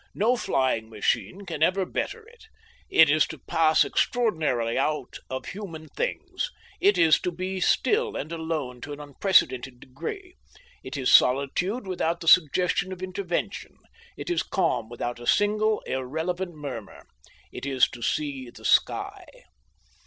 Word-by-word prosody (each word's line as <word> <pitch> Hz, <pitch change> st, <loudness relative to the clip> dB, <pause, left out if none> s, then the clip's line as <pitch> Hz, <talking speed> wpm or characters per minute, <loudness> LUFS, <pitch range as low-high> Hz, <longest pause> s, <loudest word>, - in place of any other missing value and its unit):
No 230 Hz, +5 st, +3 dB
flying 130 Hz, -, 0 dB
machine 110 Hz, -, -1 dB
can 170 Hz, -4 st, -6 dB
ever 185 Hz, +3 st, +3 dB
better 450 Hz, -, -4 dB
it. 475 Hz, +1 st, -18 dB, 0.4 s
It 160 Hz, -, +7 dB
is 155 Hz, +1 st, +3 dB
to 155 Hz, -, -8 dB
pass 155 Hz, +3 st, +3 dB
extraordinarily 155 Hz, -, 0 dB
out 150 Hz, +3 st, -1 dB
of 130 Hz, 0 st, -4 dB
human 165 Hz, -6 st, -8 dB
things. -, -, -3 dB, 0.3 s
It 400 Hz, +3 st, +4 dB
is 160 Hz, -2 st, +5 dB
to 180 Hz, -, -1 dB
be 185 Hz, +2 st, -4 dB
still 440 Hz, -, +2 dB
and 155 Hz, -, -5 dB
alone 160 Hz, -7 st, -4 dB
to 145 Hz, -, -6 dB
an 145 Hz, -, -9 dB
unprecedented 135 Hz, -5 st, +1 dB
degree. 360 Hz, -, -8 dB, 0.5 s
It -, -, -6 dB
is 130 Hz, -2 st, +2 dB
solitude 160 Hz, -, +3 dB
without 170 Hz, -2 st, -1 dB
the 165 Hz, -, -8 dB
suggestion 180 Hz, +3 st, +4 dB
of 185 Hz, 0 st, -7 dB
intervention; 185 Hz, -1 st, -4 dB, 0.4 s
it -, -, -4 dB
is 350 Hz, -, +1 dB
calm 165 Hz, -11 st, -1 dB
without 120 Hz, 0 st, -4 dB
a 120 Hz, -, -9 dB
single 215 Hz, +1 st, +2 dB
irrelevant 160 Hz, +7 st, -3 dB
murmur. 145 Hz, -3 st, -8 dB, 0.5 s
It -, -, -6 dB
is 130 Hz, -2 st, +4 dB
to 120 Hz, -, -11 dB
see 135 Hz, -2 st, -2 dB
the -, -, -14 dB
sky. -, -, +2 dB
160 Hz, 145 wpm, -26 LUFS, 135-190 Hz, 0.5 s, It